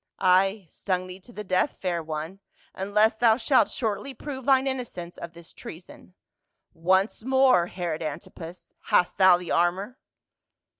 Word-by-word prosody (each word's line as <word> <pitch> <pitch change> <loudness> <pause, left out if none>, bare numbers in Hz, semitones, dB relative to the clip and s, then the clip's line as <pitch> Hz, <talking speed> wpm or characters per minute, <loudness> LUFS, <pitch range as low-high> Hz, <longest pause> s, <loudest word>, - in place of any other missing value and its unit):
" - - -64 0.2
Ay, 195 +1 -2
stung 185 +2 -3
thee 185 +1 -10
to 215 +6 -16
the 210 -2 -7
death, 185 +7 0
fair 175 -3 -2
one, 160 +4 -6 0.3
unless 210 +3 +1
thou 230 -2 +5
shalt 265 0 +3
shortly 235 +3 -3
prove 265 -4 -7
thine 265 -1 +4
innocence 240 -10 -5
of 170 0 -9
this 170 0 -13
treason. 180 +2 -12 0.6
Once 190 +6 +1
more, 260 -8 +4
Herod 175 -3 -4
Antipas, 165 +3 -8
hast 180 - +1
thou 185 -2 +7
the 175 -1 -7
armor?" 190 +8 0
190 Hz, 150 wpm, -26 LUFS, 175-230 Hz, 0.6 s, thou